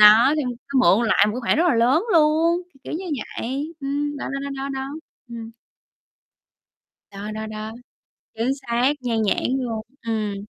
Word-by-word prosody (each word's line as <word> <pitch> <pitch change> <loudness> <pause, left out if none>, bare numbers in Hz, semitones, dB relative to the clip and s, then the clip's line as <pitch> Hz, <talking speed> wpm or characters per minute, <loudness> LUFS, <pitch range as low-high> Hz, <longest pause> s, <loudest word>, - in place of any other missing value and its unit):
đó, 215 +6 +8
thì 305 - +1 0.3
xong 265 - +4
mượn 235 -1 +5
lại 215 - +5
một 210 - 0
cái 250 - -3
khoản 235 - +2
rất 330 - +3
là 285 - +3
lớn 250 - +3
luôn, 330 +2 +4 0.2
k 270 - -50
kiểu - - -6
như 345 +5 -3 0.3
vậy, 275 +6 -3
ừm, 290 +1 -2
đó, - - -4 0.2
đó, 280 - -4
đó, 270 +1 -3
đó. 265 0 -3 0.4
Ừm. 230 -1 -7 1.6
Đó, 200 +2 -6
đó, 220 0 -4
đó, 215 0 -6 0.6
chính 230 +3 0
xác, 255 0 +1
nhan 230 -3 0
nhãn 205 - +1
luôn, 235 -4 -2 0.3
ừm. 215 -2 -1
250 Hz, 175 wpm, -23 LUFS, 220-285 Hz, 1.6 s, đó